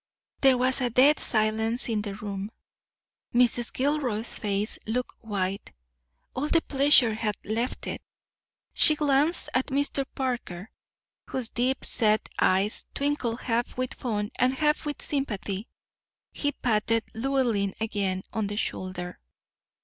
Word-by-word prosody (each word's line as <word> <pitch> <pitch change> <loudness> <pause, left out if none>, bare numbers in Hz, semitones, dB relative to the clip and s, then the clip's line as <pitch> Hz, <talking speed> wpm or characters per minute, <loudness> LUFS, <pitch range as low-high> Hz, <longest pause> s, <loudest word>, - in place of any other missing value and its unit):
There 265 -2 +5
was 255 +2 +2
a 250 - +1
dead 270 +6 +5
silence 220 +2 +2
in 220 -3 0
the 205 -2 -5
room. 200 -1 -5 0.9
Mrs. 240 -1 +3
Gilroy's 255 -5 0
face 205 +1 -1
looked 245 +3 -2
white; 200 -3 -3 0.6
all 280 +3 -2
the 330 +1 +2
pleasure 275 -4 +5
had 215 -1 -2
left 230 +5 -3
it. - - -5 0.7
She 310 - +8
glanced 295 +3 +2
at 255 - 0 0.5
Parker, 240 -7 -4 0.6
whose 250 -4 -3
deep 255 +2 0
set 215 -2 +1
eyes 195 +3 +1
twinkled 275 -5 -1
half 235 0 -2
with 255 0 -2
fun 210 -4 -3
and 255 +1 +3
half 300 +2 +1
with 295 - -2
sympathy. 215 -7 -3 0.6
He 290 -1 -1
patted 225 0 +1
Llewellyn 230 -5 0
again 200 -4 -2
on 220 -2 -1
the 205 +1 -5
shoulder. 185 -4 -4
230 Hz, 125 wpm, -27 LUFS, 210-265 Hz, 0.9 s, She